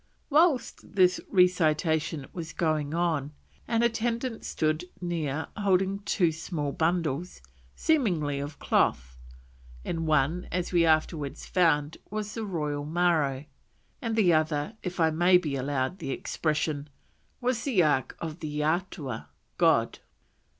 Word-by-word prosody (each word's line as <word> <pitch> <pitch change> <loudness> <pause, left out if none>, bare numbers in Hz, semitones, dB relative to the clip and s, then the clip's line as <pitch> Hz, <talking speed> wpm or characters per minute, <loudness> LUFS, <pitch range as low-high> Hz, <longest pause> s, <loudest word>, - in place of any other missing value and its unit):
Whilst 290 -8 +2
this 185 -2 +4
recitation 160 -5 +2
was 170 -2 -6
going 155 -2 0
on 160 -4 0 0.3
an 230 0 +1
attendant 235 +1 -1
stood 155 +2 -1
near 160 -4 -2
holding 195 -1 +1
two 195 -4 +1
small 155 -2 -3
bundles 165 0 -1 0.4
"seemingly 175 - +1
of 145 +1 -6
cloth; 65 0 +1 0.7
in 165 -1 -3
one, 155 +3 +1
as 180 0 -2
we 170 -2 +4
afterwards 155 -2 0
found, 160 -4 +2
was 210 0 -4
the 225 -1 -4
Royal 150 -5 -2
Maro, 155 -4 +1 0.6
and 230 -3 -2
the 190 -6 +4
other, 155 +4 0
if 180 -1 -5
I 160 -1 +4
may 175 +3 +5
be 155 -6 -2
allowed 135 +5 -2
the 155 - -5
expression, 150 0 -2 0.5
was 250 -2 0
the 225 -11 +3
ark 145 -4 +1
of 160 0 -5
the 150 -2 -3
Eatua" 155 - -2 0.3
[God]. - - +3
165 Hz, 130 wpm, -28 LUFS, 150-185 Hz, 0.7 s, may